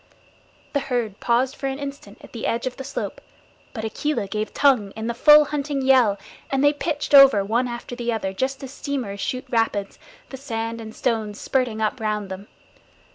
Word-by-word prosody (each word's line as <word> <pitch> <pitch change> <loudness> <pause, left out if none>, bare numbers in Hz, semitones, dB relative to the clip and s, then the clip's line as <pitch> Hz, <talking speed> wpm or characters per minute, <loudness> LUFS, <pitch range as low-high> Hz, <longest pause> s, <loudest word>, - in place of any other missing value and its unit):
The 285 - +2
herd 245 -7 -2
paused 250 +3 +1
for 275 - -4
an 270 0 -3
instant 275 -7 -8
at - - -13
the 230 - -3
edge 230 +2 -1
of 255 - -3
the 270 - -7
slope, - - -5 0.5
but 220 -2 -5
Akela 290 +2 -2
gave 215 +2 -3
tongue 255 -8 +3
in 220 - -5
the 235 - -1
full 300 +5 +7
hunting 285 -1 -2
yell, 255 -6 +4 0.3
and 270 0 +1
they 290 0 +5
pitched 295 0 -3
over 270 -8 +8
one 235 +5 +1
after 240 0 -6
the 240 -1 -2
other, 195 -4 -2
just 265 +7 -2
as 265 - -7
steamers 250 -10 -4
shoot 255 +5 -3
rapids, 225 -4 -1 0.3
the 265 - -6
sand 230 -3 -4
and 220 -1 -9
stones 220 -4 -1
spurting 245 -5 -1
up 220 +4 0
round 210 -2 -2
them. 190 +2 -8
240 Hz, 190 wpm, -23 LUFS, 220-270 Hz, 0.5 s, over